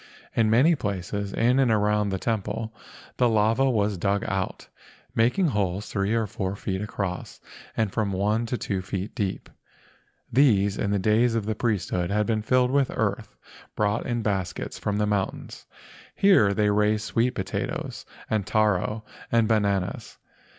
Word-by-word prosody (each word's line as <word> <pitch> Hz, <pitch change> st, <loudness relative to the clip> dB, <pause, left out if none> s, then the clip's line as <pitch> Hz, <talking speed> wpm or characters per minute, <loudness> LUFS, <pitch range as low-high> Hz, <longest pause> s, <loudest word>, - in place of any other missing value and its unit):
In 115 Hz, -2 st, +3 dB
many 130 Hz, +10 st, +5 dB
places 100 Hz, -, -3 dB
in 125 Hz, +5 st, +2 dB
and 130 Hz, -3 st, +3 dB
around 105 Hz, -1 st, +2 dB
the 95 Hz, -, -1 dB
temple 110 Hz, +1 st, -3 dB, 0.4 s
the 125 Hz, -1 st, +3 dB
lava 115 Hz, +5 st, +3 dB
was 105 Hz, -5 st, 0 dB
dug 100 Hz, +2 st, 0 dB
out, 95 Hz, -1 st, -3 dB, 0.5 s
making 125 Hz, +11 st, +2 dB
holes 100 Hz, -3 st, -1 dB
three 100 Hz, +2 st, 0 dB
or 115 Hz, -1 st, +1 dB
four 95 Hz, -1 st, -3 dB
feet 95 Hz, -1 st, -3 dB
across 100 Hz, -3 st, -4 dB, 0.4 s
and 110 Hz, -3 st, +1 dB
from 105 Hz, -1 st, -1 dB
one 105 Hz, +5 st, 0 dB
to 125 Hz, -, -2 dB
two 95 Hz, -5 st, -2 dB
feet 95 Hz, +2 st, -4 dB
deep. 100 Hz, -6 st, -3 dB, 0.9 s
These 105 Hz, -7 st, +4 dB
in 100 Hz, -, 0 dB
the 100 Hz, -, +1 dB
days 110 Hz, +4 st, +2 dB
of 110 Hz, -3 st, -1 dB
the 110 Hz, -, -1 dB
priesthood 100 Hz, -6 st, -1 dB
had 105 Hz, +1 st, +1 dB
been 110 Hz, -1 st, 0 dB
filled 125 Hz, +3 st, +2 dB
with 140 Hz, -1 st, +2 dB
earth -, -, -2 dB, 0.4 s
brought 105 Hz, +1 st, 0 dB
in 120 Hz, -2 st, -1 dB
baskets 95 Hz, -5 st, -3 dB
from 105 Hz, -1 st, -1 dB
the 105 Hz, -, +2 dB
mountains. 105 Hz, -2 st, -3 dB, 0.5 s
Here 190 Hz, -, +5 dB
they 105 Hz, +1 st, +2 dB
raised 105 Hz, +1 st, +2 dB
sweet 115 Hz, +3 st, 0 dB
potatoes 95 Hz, +1 st, -4 dB, 0.2 s
and 105 Hz, -3 st, -1 dB
taro 110 Hz, 0 st, +1 dB, 0.3 s
and 115 Hz, -1 st, +3 dB
bananas. 100 Hz, -4 st, 0 dB
105 Hz, 155 wpm, -25 LUFS, 100-115 Hz, 0.9 s, many